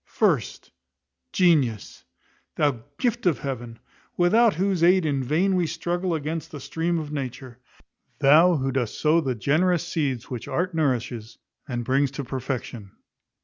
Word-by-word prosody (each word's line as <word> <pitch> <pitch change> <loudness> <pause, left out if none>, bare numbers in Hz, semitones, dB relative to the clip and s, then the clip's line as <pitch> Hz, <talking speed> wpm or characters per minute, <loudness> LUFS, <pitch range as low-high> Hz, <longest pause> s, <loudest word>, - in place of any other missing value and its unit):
First, - - 0 0.6
Genius; 145 - +1 0.5
thou 145 -6 +1 0.2
gift 240 -4 0
of 160 -7 +2
Heaven; 120 -3 -6 0.4
without 215 +5 +4
whose 185 -1 0
aid 180 0 +5
in 140 -3 0
vain 175 +9 +1
we 175 -2 +1
struggle 175 +2 -2
against 160 +1 -4
the 145 - -8
stream 165 +5 -2
of 155 -2 -5
nature. 130 -3 -6 0.6
Thou 155 +5 +6
who 135 -2 -1
dost 125 -4 -2
sow 160 +2 +3
the 130 -5 -2
generous 170 - +1
seeds 140 -8 -2
which 125 -3 -6
art 180 +1 -1
nourishes, 125 -6 -2 0.3
and 120 -3 -4
brings 135 +3 +2
to 140 - -3
perfection. 125 -5 -5
150 Hz, 145 wpm, -24 LUFS, 130-175 Hz, 0.6 s, Thou